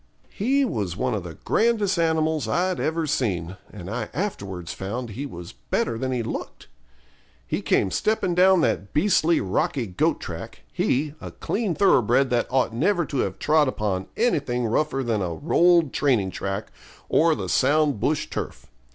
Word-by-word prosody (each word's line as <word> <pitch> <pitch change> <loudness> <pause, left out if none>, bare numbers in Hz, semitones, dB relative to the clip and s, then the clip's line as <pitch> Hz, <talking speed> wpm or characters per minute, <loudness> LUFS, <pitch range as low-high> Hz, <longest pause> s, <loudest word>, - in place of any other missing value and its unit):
He 270 +6 +1
was 100 - -3
one 125 +1 0
of 105 - -1
the 85 -2 -8
grandest 215 -5 +2
animals 160 -4 +1
I'd 180 +10 0
ever 160 +1 0
seen, 95 - -1
and 90 -4 -9
I 110 +1 -4
afterwards 95 - -4
found 115 +5 -5
he 135 +7 -5
was 85 -8 -9
better 85 - -2
than 130 +3 -2
he 125 -2 -1
looked. - - -6 0.8
He - - -2
came 95 - +1
stepping 215 - 0
down 185 0 +5
that 100 -9 -1
beastly 170 -1 +3
rocky 110 +6 -1
goat 90 -4 0
track, - - -8
he, 145 +3 0
a - - -6
clean 205 -6 -2
thoroughbred 130 - +3
that 120 -1 +1
ought 125 -3 +1
never 175 - +1
to 140 - -4
have 95 -5 -1
trod 150 -1 +3
upon 100 -7 -2
anything 140 - +1
rougher 135 +4 0
than 115 -4 0
a 85 -3 -2
rolled 170 - +3
training 120 -10 +1
track, 95 +3 -4 0.4
or 160 0 +3
the 95 -4 -4
sound 145 - +2
bush 150 +7 0
turf. - - -6
130 Hz, 165 wpm, -24 LUFS, 105-165 Hz, 0.8 s, down